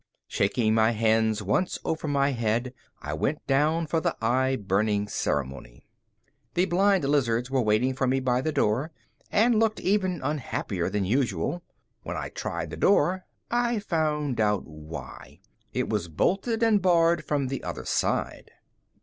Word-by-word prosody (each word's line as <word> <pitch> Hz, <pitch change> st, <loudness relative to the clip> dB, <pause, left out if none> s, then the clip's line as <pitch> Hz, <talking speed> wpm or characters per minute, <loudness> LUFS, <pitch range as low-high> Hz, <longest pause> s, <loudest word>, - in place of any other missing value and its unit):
Shaking 110 Hz, +2 st, +1 dB
my 110 Hz, +1 st, +3 dB
hands 110 Hz, -1 st, +2 dB
once 105 Hz, -, 0 dB
over 160 Hz, -1 st, -2 dB
my 140 Hz, -1 st, +2 dB
head, 120 Hz, +1 st, -1 dB, 0.3 s
I 75 Hz, -, -4 dB
went 135 Hz, -, -2 dB
down 155 Hz, +4 st, +2 dB
for 160 Hz, +1 st, 0 dB
the -, -, -1 dB
eye 130 Hz, +3 st, +1 dB
burning 105 Hz, -1 st, 0 dB
ceremony. 65 Hz, -9 st, -3 dB, 0.7 s
The 180 Hz, +1 st, +3 dB
blind 195 Hz, 0 st, +2 dB
lizards 125 Hz, -3 st, +1 dB
were 135 Hz, -1 st, +2 dB
waiting 110 Hz, +4 st, +2 dB
for 130 Hz, 0 st, -1 dB
me 130 Hz, +1 st, +2 dB
by 125 Hz, -1 st, +1 dB
the 155 Hz, -, -1 dB
door 130 Hz, +5 st, 0 dB, 0.4 s
and 225 Hz, +1 st, +4 dB
looked 220 Hz, -1 st, +1 dB
even 185 Hz, -3 st, 0 dB
unhappier 130 Hz, -, -2 dB
than 105 Hz, -2 st, -1 dB
usual. 120 Hz, -, 0 dB, 0.4 s
When -, -, -5 dB
I -, -, -4 dB
tried -, -, -4 dB
the -, -, -6 dB
door, 185 Hz, -2 st, +2 dB, 0.3 s
I 240 Hz, -1 st, +1 dB
found 155 Hz, -, -1 dB
out 105 Hz, -2 st, +1 dB
why 75 Hz, -1 st, -10 dB, 0.3 s
it 125 Hz, -1 st, -1 dB
was 105 Hz, -6 st, -1 dB
bolted 195 Hz, -, 0 dB
and 220 Hz, -3 st, +4 dB
barred 170 Hz, -2 st, +3 dB
from 145 Hz, -2 st, -1 dB
the 135 Hz, -, -4 dB
other -, -, -5 dB
side. -, -, -1 dB
130 Hz, 155 wpm, -26 LUFS, 110-165 Hz, 0.7 s, and